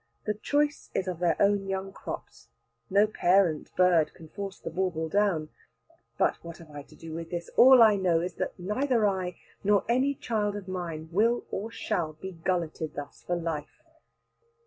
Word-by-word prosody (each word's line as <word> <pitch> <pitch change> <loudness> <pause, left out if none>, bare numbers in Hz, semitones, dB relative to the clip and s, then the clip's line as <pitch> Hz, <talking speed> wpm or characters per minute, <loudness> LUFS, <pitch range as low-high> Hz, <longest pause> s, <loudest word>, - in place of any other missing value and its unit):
The 210 - +1
choice 290 +7 0
is 190 - 0
of 180 -3 -3
their 175 -2 +1
own 200 -1 +3
young 195 0 -3
crops. - - -8 0.4
No 200 +2 +5
parent 185 -6 +2
bird 175 -4 +3
can 160 -3 -13
force 200 +1 -6
the - - -7
bauble 170 -2 -1
down. 170 -4 +1 0.7
But - - +1
what 170 0 -8
have 165 -3 -14
I 145 -1 -7
to - - -17
do 165 -1 -9
with 165 0 -6
this? 175 -1 -5
All 255 -1 +9
I 215 -2 +6
know 180 -4 +2
is 175 +1 -3
that - - -3
neither 225 +5 +1
I, 185 -3 -1 0.3
nor 205 0 +3
any 260 +4 +2
child 210 -5 -1
of 200 -2 -7
mine, 170 -4 -5
will 230 +6 +2
or 215 +4 -3
shall 165 -8 -2
be 190 +5 -8
gulleted 165 -2 -2
thus 145 -1 -8
for 175 - -2
life. 165 -3 -5
185 Hz, 180 wpm, -28 LUFS, 165-205 Hz, 0.7 s, All